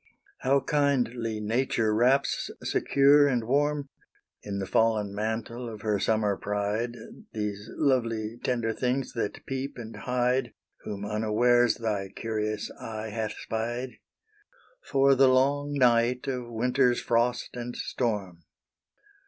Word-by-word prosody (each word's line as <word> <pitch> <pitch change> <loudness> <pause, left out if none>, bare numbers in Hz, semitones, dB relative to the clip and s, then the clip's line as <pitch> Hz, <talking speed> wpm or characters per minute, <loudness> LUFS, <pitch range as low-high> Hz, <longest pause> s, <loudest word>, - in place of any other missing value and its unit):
How 135 +2 +2
kindly 125 -7 0
nature 110 0 0
wraps 125 +5 +2
secure 140 +1 +4
and 125 -4 +1
warm, 145 +3 0 0.5
In 100 -1 -5
the 95 - -2
fallen 105 -1 +1
mantle 110 +3 -3
of 110 -2 -9
her 105 -2 0
summer 105 -2 +1
pride, 105 +4 -2 0.4
These 105 -1 -4
lovely 115 -5 0
tender 120 -3 0
things 125 +3 -1
that 105 -4 -4
peep 135 +1 -4
and 115 -2 -8
hide, 125 +1 0 0.3
Whom 100 -1 -5
unawares 110 +3 +3
thy 105 -5 -2
curious 110 -1 -3
eye 110 -1 -5
hath 110 0 -3
spied, 120 +3 -3 0.9
For 135 0 +4
the 135 0 +5
long 140 +3 +2
night 125 -1 +3
of 125 -3 -3
winter's 125 +2 +2
frost 120 +1 +1
and 120 0 -5
storm. 100 -8 -3
120 Hz, 120 wpm, -27 LUFS, 110-130 Hz, 0.9 s, the